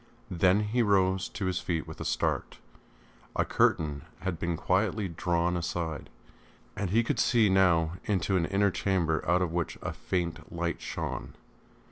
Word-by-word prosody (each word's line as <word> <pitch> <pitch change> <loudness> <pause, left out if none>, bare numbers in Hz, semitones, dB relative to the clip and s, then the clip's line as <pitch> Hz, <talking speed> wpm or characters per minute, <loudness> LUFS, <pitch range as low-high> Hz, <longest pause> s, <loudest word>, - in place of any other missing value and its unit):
Then 90 +3 +3
he 110 +4 +1
rose 95 -3 +2
to 100 - -4
his 90 -1 0
feet 80 -3 -2
with - - -8
a - - -4
start. - - -1 0.8
A - - +2
curtain 75 -3 +1 0.2
had 95 -2 -3
been 85 -1 -1
quietly 100 +5 +1
drawn 85 +1 0
aside, 80 -4 -3 0.7
and 100 -3 -2
he 115 +5 +3
could - - -1
see 115 -4 +4
now 90 -3 +3
into 95 -1 +1
an 85 -2 +2
inner 100 0 +2
chamber 85 -3 0
out 90 +1 +4
of 85 - -2
which 85 -1 -2
a - - -3
faint 85 -2 -3
light 85 0 -2
shone. - - -5
90 Hz, 160 wpm, -29 LUFS, 85-95 Hz, 0.8 s, see